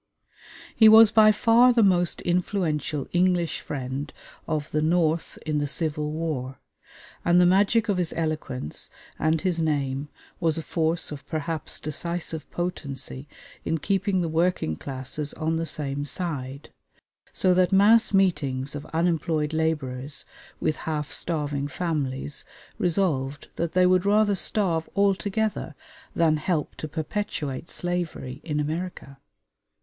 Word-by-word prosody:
He 220 -1 +8
was 220 0 +9
by 215 -1 +7
far 235 +3 +5
the 235 -2 +4
most 175 -3 +2
influential 170 -5 -1
English 175 -1 +2
friend 135 0 -5 0.4
of 155 -2 -2
the 150 - +1
North 160 0 +1
in 155 -1 0
the 145 - -1
Civil 150 +1 -2
War, 150 -5 -3 0.7
and 175 +1 +4
the 180 - +6
magic 205 +5 +3
of 200 -3 +1
his 175 -3 -1
eloquence 155 - -2 0.3
and 155 0 +1
his 180 -3 0
name 145 -3 -1 0.3
was 165 -2 +1
a 165 - -3
force 160 +2 -1
of 145 -2 -7
perhaps 155 0 -3
decisive 160 +1 -4
potency 140 - -5 0.4
in 165 - 0
keeping 195 +3 0
the 170 - -1
working 160 - 0
classes 135 - -3
on 160 0 -1
the 165 0 -2
same 145 -2 -1
side; 140 -3 -4 0.6
so 185 -1 +3
that 180 0 +3
mass 215 +4 +5
meetings 145 -9 +1
of 145 0 -7
unemployed 160 -2 0
laborers 145 -4 -2 0.3
with 155 - 0
half 150 -2 -2
starving 145 -4 -2
families 145 -4 -3 0.4
resolved 155 -6 0
that 170 -1 -2
they 185 0 +4
would 185 +1 +3
rather 210 0 +4
starve 180 -4 0
altogether 200 +2 0 0.4
than 160 -2 +3
help 155 -1 -1
to 155 - -6
perpetuate 160 -2 -4
slavery 170 -6 -4
in 150 -2 -2
America. 155 -2 -4
160 Hz, 135 wpm, -25 LUFS, 145-180 Hz, 0.7 s, was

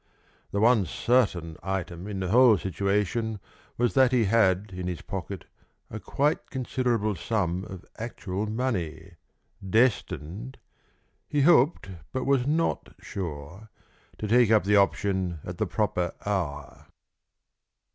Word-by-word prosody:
The 100 - -1
one 110 -3 +4
certain 95 -10 +1
item 95 -1 -4
in 100 -2 -4
the 90 - -2
whole 120 0 +6
situation 105 +3 -1 0.4
was 120 0 +1
that 130 -2 +5
he 125 -3 +3
had 100 -2 +2
in 90 0 -4
his 90 -2 -4
pocket 95 -2 -6 0.5
a 110 - -5
quite 145 - -1
considerable 120 -4 -1
sum 95 -1 -1
of 95 -2 -10
actual 105 -3 -4
money, 110 -8 -3 0.5
destined 110 - 0 0.7
he 145 - +1
hoped 140 - +4 0.2
but 130 - -2
was 135 -2 +2
not 165 +3 -1
sure 85 +3 -7 0.5
to 105 - -4
take 120 +1 +4
up 110 -1 +5
the 105 +2 +3
option 95 -3 +1
at - - -7
the - - +1
proper 90 -1 -1
hour. 80 -9 -3
105 Hz, 125 wpm, -27 LUFS, 95-120 Hz, 0.7 s, whole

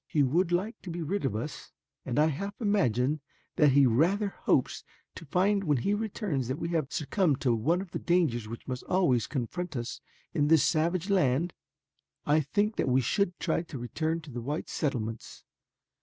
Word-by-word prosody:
He 150 - +2
would 170 +7 +2
like 190 +7 -1
to 185 - -8
be 170 0 -4
rid 190 +1 -2
of 110 - -1
us, 120 +8 -6 0.4
and 120 - -2
I 150 - +5
half 195 +7 -3
imagine 155 - +1 0.4
that 150 -5 +5
he 140 0 +6
rather 175 - +2
hopes - - 0 0.3
to 165 - -10
find 195 +6 +2
when 150 -6 +2
he 200 +12 0
returns 205 - -2
that 130 +3 -2
we 165 - -3
have 160 -5 -1
succumbed 155 -2 +1
to 125 -3 +2
one 155 +11 +1
of 190 -3 -9
the - - -3
dangers 155 -11 +1
which 115 +1 -8
must 125 -2 -3
always 135 - +2
confront 155 +6 -4
us 120 -1 -4 0.3
in 145 - +2
this 160 -1 +5
savage 170 +4 +1
land. 165 -2 +2 0.7
"I 150 +2 +4
think 205 +8 0
that - - +1
we 130 +1 +4
should 180 - 0
try 160 -1 0
to 165 -4 -8
return 160 +7 -2
to 155 -3 -11
the 120 0 -5
white 145 +6 -4
settlements. 115 -7 -3
155 Hz, 190 wpm, -29 LUFS, 130-180 Hz, 0.7 s, he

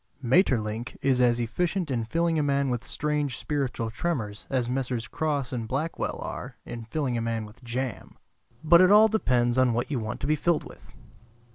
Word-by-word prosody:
Maeterlinck 120 - +1
is 130 -2 +3
as 120 -1 +3
efficient 165 - -1
in 115 -3 -1
filling 165 +5 +1
a - - +3
man 140 -2 +1
with 120 -2 -2
strange 150 -4 -1
spiritual 130 -6 -2
tremors 110 -8 -3
as 125 -3 0
Messrs. 125 -2 -2
Crosse 145 -5 -2
and 115 -3 -3
Blackwell 145 +7 -2
are 125 -1 -6
in 115 -1 -7
filling 125 -1 -1
a - - -2
man 115 -1 -2
with 105 +4 -15
jam. 125 0 -4 0.5
But 170 +2 +7
it 185 - +6
all 215 +1 +7
depends 125 - +2
on 130 -2 +4
what 120 +5 -2
you 135 - 0
want 110 +1 -4
to - - -1
be 155 +2 +2
filled 165 +1 +1
with. - - -14
130 Hz, 185 wpm, -27 LUFS, 115-150 Hz, 0.5 s, But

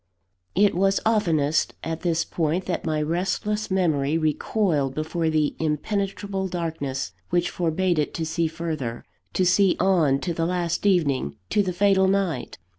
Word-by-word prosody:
It 205 +2 +4
was 195 +2 +2
oftenest 160 -9 +2
at 165 0 -4
this 170 -2 0
point, 165 +2 -1
that - - -3
my 155 -1 0
restless 190 +6 -1
memory 160 -6 +1
recoiled 155 -2 0
before 160 +1 -1
the 155 -2 +1
impenetrable 195 +5 -2
darkness 160 -7 -3 0.2
which 175 0 +1
forbade 175 0 0
it 150 - 0
to 165 - -2
see 160 +1 0
further 155 -7 -4 0.3
to 185 - +2
see 190 +1 +4
on 170 -8 +3
to 175 - -2
the 165 0 -1
last 175 +2 -1
evening, 140 - +1 0.2
to 210 - +3
the 190 -2 -1
fatal 190 +1 +3
night. 190 -9 -1
170 Hz, 150 wpm, -24 LUFS, 155-190 Hz, 0.3 s, It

